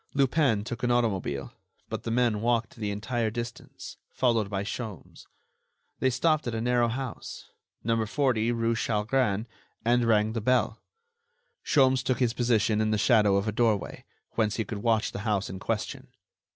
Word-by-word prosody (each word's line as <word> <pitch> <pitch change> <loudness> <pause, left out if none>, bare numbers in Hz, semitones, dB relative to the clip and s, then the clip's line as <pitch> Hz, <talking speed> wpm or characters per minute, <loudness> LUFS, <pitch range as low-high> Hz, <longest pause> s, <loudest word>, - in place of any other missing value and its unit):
Lupin 135 -5 +2
took 120 +2 -6
an 125 - 0
automobile; 100 - 0 0.3
but - - -4
the - - -5
men 115 -3 +1
walked 115 -1 0
the 105 -3 -3
entire 110 +3 -1
distance, 120 +1 -7
followed 115 -5 +1
by 100 -1 -2
Sholmes. 105 -2 -7 0.7
They 130 - +3
stopped 155 +3 +1
at 115 - -2
a - - -1
narrow 120 0 +2
house, 125 +1 -6 0.3
No. 115 0 +1
40 120 -1 +1
rue 115 0 +1
Chalgrin, 110 0 0 0.4
and 120 0 +3
rang 110 -1 +3
the 115 - -2
bell. 120 -1 +1 0.8
Sholmes 130 -3 +3
took 130 -1 0
his 125 -3 +1
position 115 -3 +2
in 110 - +1
the 110 - +1
shadow 105 -3 +4
of 100 +2 0
a - - +1
doorway, 110 -3 0 0.3
whence 110 -2 0
he 110 - -1
could 105 - -5
watch 110 0 +1
the - - -6
house 105 -3 -1
in 95 - -7
question. - - -3
115 Hz, 165 wpm, -27 LUFS, 105-120 Hz, 0.8 s, shadow